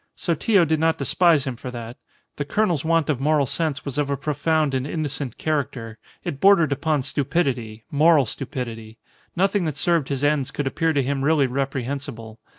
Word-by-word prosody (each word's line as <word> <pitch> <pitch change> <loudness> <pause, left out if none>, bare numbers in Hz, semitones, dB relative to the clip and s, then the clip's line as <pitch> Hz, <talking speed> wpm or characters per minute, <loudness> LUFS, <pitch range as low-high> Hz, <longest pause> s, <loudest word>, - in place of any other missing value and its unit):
Sotillo 175 +2 +2
did 160 0 0
not 160 0 +2
despise 155 +1 +3
him 130 -2 -3
for 125 - -7
that. 120 -1 -7 0.4
The 145 - -1
colonel's 175 -1 0
want 165 -1 +2
of 150 -5 0
moral 150 0 +2
sense 140 0 -2
was 140 0 -3
of 145 -1 0
a 140 - -1
profound 150 +1 0
and 130 +1 -1
innocent 145 -5 -3
character. 130 -7 -3 0.2
It 140 - -4
bordered 195 -6 +5
upon 145 0 0
stupidity, 130 -6 -1
moral 150 -1 +5
stupidity. 115 -3 -6 0.4
Nothing 195 +1 +1
that 150 -3 -3
served 165 -3 +1
his 140 -1 -2
ends 145 -3 +1
could 145 - -4
appear 165 +4 0
to 140 -3 +1
him 135 +1 -2
really 150 -1 +3
reprehensible. 130 -4 -4
145 Hz, 175 wpm, -23 LUFS, 130-160 Hz, 0.4 s, bordered